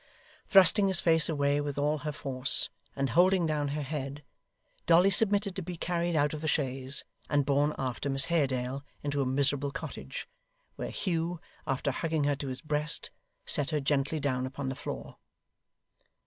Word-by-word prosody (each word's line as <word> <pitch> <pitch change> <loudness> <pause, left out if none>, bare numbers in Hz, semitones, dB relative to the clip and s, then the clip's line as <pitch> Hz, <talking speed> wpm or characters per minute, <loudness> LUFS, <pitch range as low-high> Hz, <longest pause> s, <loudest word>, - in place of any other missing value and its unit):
Thrusting 195 +1 +7
his 190 -2 +4
face 160 -2 +3
away 145 -2 +1
with 145 -1 -4
all 150 +1 +1
her 150 +1 -3
force, 135 -2 +2 0.2
and 135 -3 -1
holding 180 +3 +4
down 150 -2 0
her 145 +1 -3
head, 140 0 -5 0.6
Dolly 175 +4 +6
submitted 200 -1 +2
to 190 - -3
be 175 0 -6
carried 170 0 -1
out 145 0 +2
of 155 - -5
the 160 - -3
chaise, 135 -2 -1 0.3
and 145 -2 +2
borne 145 +2 +2
after 130 +1 -3
Miss 135 +1 +1
Haredale 135 -5 0 0.2
into 145 -1 -1
a 135 - 0
miserable 140 +1 +1
cottage, - - -7 0.5
where - - -5
Hugh, 170 -2 -2 0.3
after 135 0 0
hugging 160 +2 -1
her 145 0 +2
to 140 - -5
his 130 -1 -5
breast, 150 -1 0 0.3
set 145 0 +1
her 155 -2 0
gently 140 +2 0
down 130 -3 -1
upon 135 0 -4
the 135 - -4
floor. - - -7
145 Hz, 170 wpm, -30 LUFS, 140-165 Hz, 0.6 s, Thrusting